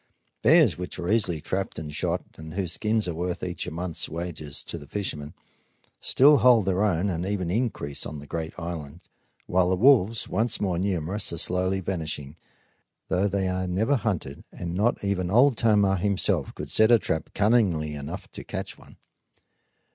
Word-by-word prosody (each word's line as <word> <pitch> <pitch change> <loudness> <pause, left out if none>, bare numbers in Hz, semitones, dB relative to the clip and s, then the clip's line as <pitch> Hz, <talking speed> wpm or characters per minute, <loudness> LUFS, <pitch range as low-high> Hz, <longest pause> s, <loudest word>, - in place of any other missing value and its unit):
Bears, - - +5
which 90 - -5
are 90 +2 -2
easily 100 -8 +2
trapped 95 +5 -3
and 75 -2 -6
shot - - -1
and 80 +1 -10
whose 90 -4 -2
skins 110 0 0
are 85 - -2
worth 90 +2 -3
each 90 -1 -4
a - - -4
month's 85 0 -3
wages 80 -3 -4
to 85 - -7
the 75 - -12
fishermen, 75 -7 -4 0.6
still 145 +3 +5
hold 120 -6 +5
their 95 0 +1
own 95 -2 +1
and 85 -3 -2
even 95 -3 -2
increase 100 - -2
on 75 - -7
the 70 - -9
great 80 +1 -5
island; 80 -1 -6 0.4
while 90 0 +2
the 95 - +2
wolves, 115 -1 +4
once 110 +3 0
more 90 -4 0
numerous, 95 +1 -1
are 85 - -4
slowly 95 +3 +1
vanishing, 80 -6 -4 0.7
though 95 +2 +2
they 100 -1 -1
are 95 0 -1
never 110 +10 +1
hunted, 95 - -3
and 85 -1 -6
not 105 +6 0
even 95 -3 -1
Old 125 +6 +5
Tomah 105 -4 +3
himself 95 -5 0
could - - -6
set 110 0 +5
a 120 - +7
trap 80 -6 -2
cunningly 100 -9 +2
enough 70 -1 -6
to - - -8
catch - - -6
one. - - -17
90 Hz, 180 wpm, -26 LUFS, 80-105 Hz, 0.7 s, a